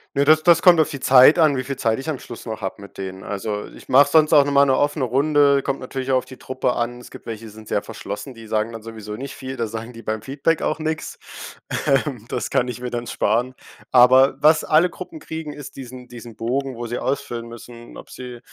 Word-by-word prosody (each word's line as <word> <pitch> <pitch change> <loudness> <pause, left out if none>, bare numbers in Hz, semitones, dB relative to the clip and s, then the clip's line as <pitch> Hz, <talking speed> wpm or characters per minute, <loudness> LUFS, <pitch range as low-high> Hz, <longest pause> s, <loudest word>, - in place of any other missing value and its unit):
Ne, 140 +1 +2
das 155 +1 +5
das 170 0 +4
kommt 175 -3 +7
auf 155 - +3
die 140 - -6
Zeit 130 +6 +7
an, 155 -4 +4
wie 130 - -2
viel 140 +1 -5
Zeit 115 +1 0
ich 155 - -5
am 145 - -2
Schluss 120 -1 -11
noch 110 -1 -5
hab 95 +1 -5
mit 100 - -13
denen. 95 0 -7
Also, 105 +1 -4
ich - - -15
mache 140 +3 +6
sonst 155 0 +4
auch 145 -2 +7
nochmal 140 0 +4
'ne 135 - +3
offene 145 -2 0
Runde, 140 +2 +3
kommt 135 - -3
natürlich 130 +1 -4
auch 130 - +4
auf 130 - -2
die 130 0 -12
Truppe 130 -1 -2
an. 120 +1 -3
Es - - -14
gibt - - -13
welche, 115 0 -6
die 110 - -10
sind 110 0 -14
sehr - - -1
verschlossen, 105 +6 -7
die 115 -1 -13
sagen 110 +1 -1
dann 115 -1 -8
sowieso 110 -2 -8
nicht 135 +2 -7
viel, 130 0 -7
da 115 -3 -2
sagen 115 +2 -7
die 115 - -11
beim 110 0 -4
Feedback 140 +4 -1
auch 155 - -1
nix. 155 0 -4 0.7
Ähm, 135 -4 0
das 125 - -3
kann 125 - +1
ich 125 0 -6
mir 125 - -4
dann 120 0 -4
sparen. 120 +4 0 0.4
Aber 130 +2 +6
was 155 +1 +5
alle 165 +4 +3
Gruppen 320 - -9
kriegen, 160 - -7
ist 145 -1 -10
diesen 125 -1 -10
diesen 120 -2 -11
Bogen, 130 +3 -2
wo 120 0 -6
sie 120 - -3
ausfüllen 120 -3 -3
müssen, 120 0 -12
ob - - -12
sie 125 -1 -9
130 Hz, 245 wpm, -21 LUFS, 115-140 Hz, 0.7 s, kommt